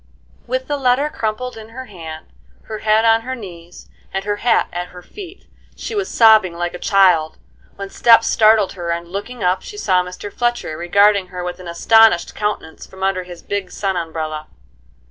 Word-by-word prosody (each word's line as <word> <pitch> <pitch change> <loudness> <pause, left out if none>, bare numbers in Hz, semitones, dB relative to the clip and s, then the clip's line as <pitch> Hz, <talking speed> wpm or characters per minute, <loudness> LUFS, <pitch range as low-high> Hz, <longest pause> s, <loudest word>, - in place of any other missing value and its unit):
With 255 +1 -2
the 290 - -1
letter 270 +2 +2
crumpled 230 0 -3
in 220 0 -11
her 260 +3 -8
hand, 160 -7 -9 0.4
her 215 -1 -7
head 215 +1 +2
on 225 0 +4
her 260 +3 -5
knees, 175 -7 -11 0.2
and 195 0 -3
her 205 0 -1
hat 240 +3 +2
at 175 +1 -4
her 180 0 -13
feet, 385 - -11 0.3
she - - -6
was 400 -2 -2
sobbing 220 -6 +5
like 175 0 -3
a 180 - -7
child, 180 -6 +3 0.4
when 200 0 -7
steps 230 -1 +5
startled 215 -2 +4
her, 175 -3 -6
and, 170 0 -3
looking 205 +6 -6
up, 180 +1 +1
she 415 - -10
saw 185 - +2
Mr. 180 +3 -8
Fletcher 240 -9 -1
regarding 200 +3 +3
her 180 0 -7
with 180 0 -5
an 180 - -10
astonished 220 +2 +4
countenance 210 -6 -4
from 190 0 -10
under 195 -1 0
his 175 -2 -11
big 200 -2 -3
sun 195 0 -2
umbrella. 160 -2 -4
195 Hz, 185 wpm, -19 LUFS, 175-225 Hz, 0.4 s, sobbing